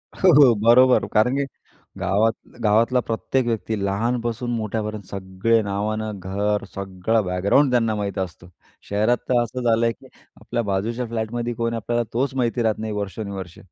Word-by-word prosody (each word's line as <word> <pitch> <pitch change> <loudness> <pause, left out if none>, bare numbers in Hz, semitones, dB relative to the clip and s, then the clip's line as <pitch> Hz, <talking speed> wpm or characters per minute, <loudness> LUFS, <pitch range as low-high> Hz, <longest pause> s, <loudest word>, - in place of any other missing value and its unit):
हो, - - +4 0.2
हो, 120 - +5
बरोबर. 120 +4 +5
कारण 120 +5 +3
की 140 - 0 0.5
गावात 110 +4 +2 0.3
गावातला 115 +4 +3
प्रत्येक 120 +2 -1
व्यक्ती, 110 -1 -1
लहानपासून 120 +3 -1
मोठ्यापर्यंत 110 -1 -3
सगळे 100 +4 0
नावानं, 105 +1 -3
घर 100 +3 -1
सगळं 100 +3 -1
बॅकग्राऊंड, 100 +10 +2
त्यांना 115 -3 +2
माहीत 100 -1 -3
असत. 85 -2 -5 0.4
शहरात 110 +4 +2
तर 120 -1 +4
असं 125 +2 -5
झालंय 115 0 +3
की - - -15 0.3
आपल्या 120 -1 -2
बाजूच्या 110 +5 -2
फ्लॅटमध्ये 115 +1 -3
कोण 115 0 -2
आहे? - - -2
आपल्याला 120 +2 -1
तोच 135 +3 0
माहिती 120 -1 0
राहत 110 -1 0
नाही 110 -1 -3
वर्षानुवर्षे. 100 -3 -5
110 Hz, 155 wpm, -22 LUFS, 100-120 Hz, 0.5 s, हो